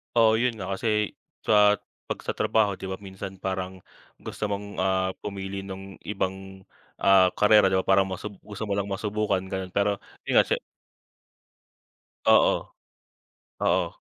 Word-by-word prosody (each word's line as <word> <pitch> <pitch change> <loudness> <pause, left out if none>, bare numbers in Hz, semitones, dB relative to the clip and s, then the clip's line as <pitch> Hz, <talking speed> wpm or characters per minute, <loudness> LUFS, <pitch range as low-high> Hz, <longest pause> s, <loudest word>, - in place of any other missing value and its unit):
Oo, 110 -1 +5
yun 125 -1 +1
nga, 100 -3 -5
kasi 105 -1 0 0.3
sa 105 -1 +5 0.3
'pag - - -3
sa - - -1
trabaho 105 -3 +1
'di 95 - -5
ba 95 - -3
minsan 95 0 -7
parang 95 -1 -4 0.3
gusto 105 - -5
mong, 100 0 -3
ah, 95 0 +1
pumili 100 -1 -5
nung 95 0 -9
ibang, 95 -1 -4 0.4
ah, 95 -1 +6
karera, 105 -1 +6
'di 95 - +1
ba? 95 - +2
Parang 95 0 +4
masub 95 +2 -5
gusto 105 +1 -8
mo 105 - -4
lang 100 0 -1
masubukan, 105 -1 -1
ganun. 95 -1 -5
Pero 100 0 +1 0.2
yun, - - +4
siye - - +1 1.7
Oo. - - +6 1.1
Oo, - - +2
95 Hz, 145 wpm, -26 LUFS, 95-105 Hz, 1.7 s, ah